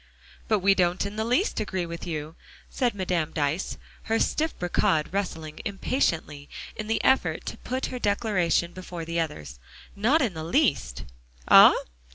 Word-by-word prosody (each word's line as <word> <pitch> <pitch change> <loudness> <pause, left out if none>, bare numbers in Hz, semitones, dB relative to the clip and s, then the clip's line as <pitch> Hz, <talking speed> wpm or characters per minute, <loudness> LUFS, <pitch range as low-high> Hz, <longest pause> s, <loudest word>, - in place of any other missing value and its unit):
"But 215 -3 +2
we 195 +1 +5
don't 180 0 +1
in 200 +1 -5
the 220 - -1
least 250 - +1
agree 190 -4 -2
with 170 +1 -7
you," 155 -1 -5 0.4
said 245 -5 0
Madame 180 -5 -1
Dyce, 150 +4 -1 0.3
her 225 - +1
stiff 315 +1 0
brocade 165 -3 +1
rustling 165 -6 -3
impatiently 170 - -2 0.3
in 215 - -5
the 220 -1 0
effort 265 - +2
to - - -5
put 260 +1 -3
her 250 - -4
declaration 200 -6 +1
before 180 -2 -7
the 165 +1 -2
others, 75 - -4 0.4
"not 255 +10 +3
in 225 -7 -1
the 160 -1 -6
least." 150 - 0 0.4
"Ah? - - +9
180 Hz, 160 wpm, -26 LUFS, 160-215 Hz, 0.4 s, Ah